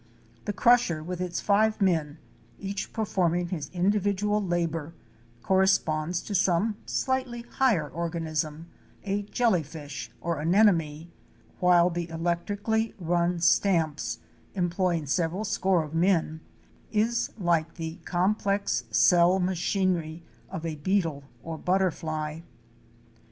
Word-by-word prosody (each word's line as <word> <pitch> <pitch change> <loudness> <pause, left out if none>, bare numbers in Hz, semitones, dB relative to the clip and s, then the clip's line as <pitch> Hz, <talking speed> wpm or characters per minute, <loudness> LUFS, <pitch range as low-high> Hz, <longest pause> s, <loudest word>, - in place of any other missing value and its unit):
The - - -1
crusher 215 -9 +3
with 180 +2 -5
its 180 -1 -2
five 215 +2 +2
men, 165 -6 +1 0.4
each 200 0 -5
performing 175 -5 0
his 155 -6 -4
individual 205 +2 +1
labor, 165 -3 -2 0.5
corresponds 180 -3 +2
to 210 - -6
some 195 +3 +2
slightly 255 -3 -1
higher 235 - +1
organism 160 -1 -3 0.2
— - - -29
a 200 +1 -1
jelly 210 -2 +1
fish 145 -6 -8
or 170 +3 -2
anemone,—while 175 0 +1
the 170 0 -4
electrically 205 +7 -1
run 175 -1 0
stamps, 165 -4 +2 0.4
employing 175 -3 0
several 170 +7 -1
score 190 -5 +1
of 150 0 -9
men, 165 -2 +1 0.5
is 230 +2 +1
like 170 -5 0
the 165 0 -5
complex 195 - 0
cell 175 - +5
machinery 180 -2 -1 0.3
of 180 -3 -6
a 160 -2 -3
beetle 160 -4 -1 0.2
or 160 -1 -6
butterfly. 160 -4 -1
175 Hz, 110 wpm, -27 LUFS, 160-200 Hz, 0.5 s, cell